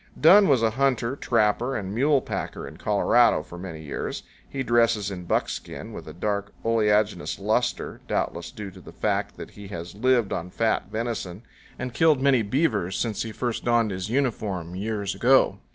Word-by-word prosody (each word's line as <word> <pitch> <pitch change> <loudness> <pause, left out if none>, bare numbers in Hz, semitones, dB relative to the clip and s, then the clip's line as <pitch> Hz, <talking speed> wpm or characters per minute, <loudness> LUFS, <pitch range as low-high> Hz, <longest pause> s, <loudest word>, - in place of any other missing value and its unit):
Dunn 195 +6 +7
was 130 -5 +3
a 110 - +3
hunter, 130 0 +1
trapper, 120 +1 +1
and 100 -2 -5
mule 140 +4 +3
packer - - -5
in - - -11
Colorado - - +3
for 85 - -11
many 85 -4 -7
years. 70 - -4 0.3
He 135 -1 -3
dresses 115 -4 +2
in 90 -2 -6
buckskin - - -3
with - - -8
a - - -7
dark 100 +2 -2
oleaginous 105 -2 +1
luster, - - -1
doubtless 85 0 -2
due 100 0 -8
to 95 0 -14
the - - -13
fact - - -1
that - - -8
he 105 -1 -11
has 85 -3 -7
lived 120 0 +2
on 90 0 -4
fat 110 +4 0
venison 110 -3 -4 0.3
and 125 -1 -5
killed 155 0 +4
many 135 -2 +4
beavers 105 - 0
since 110 -4 -1
he 115 - -4
first 120 +1 -3
donned 120 -3 +2
his 95 +1 -4
uniform 105 -9 -1
years 100 0 -2
ago. 130 +2 +3
110 Hz, 175 wpm, -25 LUFS, 100-125 Hz, 0.3 s, Dunn